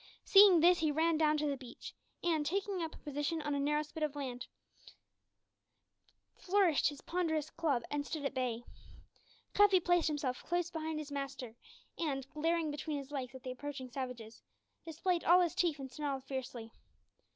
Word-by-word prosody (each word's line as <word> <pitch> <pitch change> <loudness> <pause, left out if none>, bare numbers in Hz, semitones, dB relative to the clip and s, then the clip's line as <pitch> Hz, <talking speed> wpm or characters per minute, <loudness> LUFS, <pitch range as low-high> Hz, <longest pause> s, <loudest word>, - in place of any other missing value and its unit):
Seeing 390 -4 +8
this, 355 +1 +6
he 315 -2 +2
ran 325 +2 +2
down 305 -1 +3
to 300 - -1
the 285 -1 0
beach, 255 -3 -10 0.3
and, 325 -3 +2
taking 385 +3 -1
up 320 -1 -4
a - - -13
position 295 +2 -2
on 295 -1 -1
a 285 - 0
narrow 295 +2 +1
spit 305 +1 -9
of 305 -2 0
sand, 255 -4 -5 1.9
flourished 370 -7 +3
his 290 -2 -10
ponderous 320 -4 -1
club 285 -8 0
and 290 0 -1
stood 290 0 -5
at - - -1
bay. 245 -2 -2 0.9
Cuffy 410 -2 +6
placed 350 -1 +2
himself 285 -5 -2
close 350 0 -1
behind 320 -1 -3
his 300 -1 -6
master, 275 -4 -5 0.4
and, 275 -5 -1
glaring 325 0 0
between 295 +1 -3
his 275 0 -7
legs 265 -3 -4
at 260 - -10
the 255 - -4
approaching 260 -1 -6
savages, 245 -4 -6 0.5
displayed 335 +2 -1
all 355 +2 +6
his 345 -2 +1
teeth 350 -5 +1
and 270 -2 -7
snarled 275 -1 -3
fiercely. 250 -4 -6
300 Hz, 175 wpm, -34 LUFS, 270-330 Hz, 1.9 s, Seeing